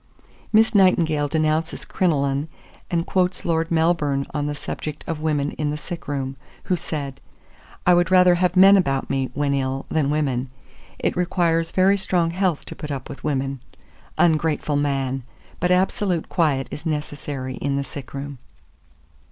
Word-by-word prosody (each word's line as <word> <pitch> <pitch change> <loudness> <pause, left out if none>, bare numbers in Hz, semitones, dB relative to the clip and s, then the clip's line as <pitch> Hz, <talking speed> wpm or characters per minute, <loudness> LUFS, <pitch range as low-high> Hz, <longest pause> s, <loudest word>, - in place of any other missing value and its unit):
Miss 220 +2 +4
Nightingale 170 -7 +3
denounces 155 +1 0
crinoline, 140 -4 0 0.4
and 170 -1 0
quotes 185 -1 0
Lord 165 0 +1
Melbourne 160 -4 +1
on 145 -1 -1
the 145 - -3
subject 150 +1 -6
of 165 -2 -3
women 150 -2 0
in 150 -1 0
the 150 - -2
sick 170 +2 -8
room, 135 -1 -3 0.3
who 185 - +1
said, 145 -5 -5 0.6
"I 180 - +6
would 175 0 +3
rather 180 -1 +6
have 180 +1 +1
men 195 +2 +8
about 135 -8 0
me, 135 -1 0
when 145 0 +1
ill, 135 0 -1
than 150 -3 +1
women; 135 -4 0 0.5
it - - -1
requires 170 -2 +1
very 195 +2 +3
strong 175 -3 +1
health 180 -3 0
to - - -8
put 150 - -7
up 135 -3 -5
with - - -9
women." 135 -2 -1 0.6
Ungrateful 155 -2 +2
man! 135 -2 0 0.4
but 180 - +1
absolute 180 -1 +1
quiet 145 -6 +1
is 150 - -7
necessary 145 -4 -4
in 140 0 -1
the 140 - 0
sick 135 -1 -9
room. 140 -1 -6
155 Hz, 160 wpm, -23 LUFS, 140-175 Hz, 0.6 s, men